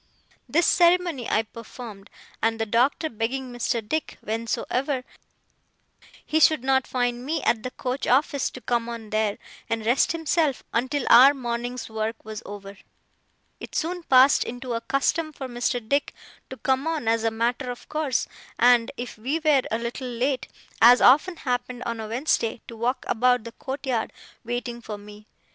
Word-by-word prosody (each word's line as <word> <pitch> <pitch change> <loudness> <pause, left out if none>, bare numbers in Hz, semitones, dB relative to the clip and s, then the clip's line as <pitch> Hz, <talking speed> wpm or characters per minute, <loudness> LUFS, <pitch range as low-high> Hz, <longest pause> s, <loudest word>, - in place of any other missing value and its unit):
This 340 +2 +3
ceremony 345 -7 +3
I 220 - +2
performed; 225 -2 -11 0.3
and 225 0 +1
the 225 - 0
Doctor 250 +8 +2
begging 245 +2 -3
Mr. 235 -2 -2
Dick, 315 +4 -2
whensoever 250 +4 -2 1.2
he 315 - +1
should 310 -3 +4
not 265 -1 +2
find 245 -1 -1
me 305 +2 -2
at 225 - +2
the 255 - -4
coach 255 +1 -4
office, 280 +1 +2
to 255 - -11
come 235 -1 -1
on 230 -2 -7
there, 215 -1 0 0.3
and 225 -1 -2
rest 240 +4 +3
himself 325 -3 0
until 260 +3 0
our 265 +5 +8
morning's 245 -1 -4
work 220 0 -4
was 215 0 -6
over, 200 -1 -9 0.8
it - - -9
soon 355 +2 -1
passed 265 -2 +5
into 245 +1 -5
a 230 - -2
custom 310 +5 0
for 270 -3 -7
Mr. 245 0 -1
Dick 280 +3 0 0.3
to 260 - -8
come 265 +3 0
on 315 -8 -2
as 225 0 +2
a 225 - +3
matter 240 +3 -1
of 245 - -7
course, 305 -5 -1 0.3
and, 240 -1 +5
if 245 -2 -7
we 265 +8 -1
were 305 -4 +3
a 225 - 0
little 235 +2 -5
late, 250 +2 -1 0.3
as 245 +2 +8
often 300 +8 +5
happened 245 -4 -3
on 230 -1 -3
a 220 - -5
Wednesday, 235 -1 0
to 230 - -9
walk 245 +3 -2
about 245 0 +2
the 230 - -8
courtyard, 265 -3 -3 0.3
waiting 240 0 -4
for 215 -2 -6
me. 210 +1 -13
245 Hz, 165 wpm, -25 LUFS, 230-275 Hz, 1.2 s, our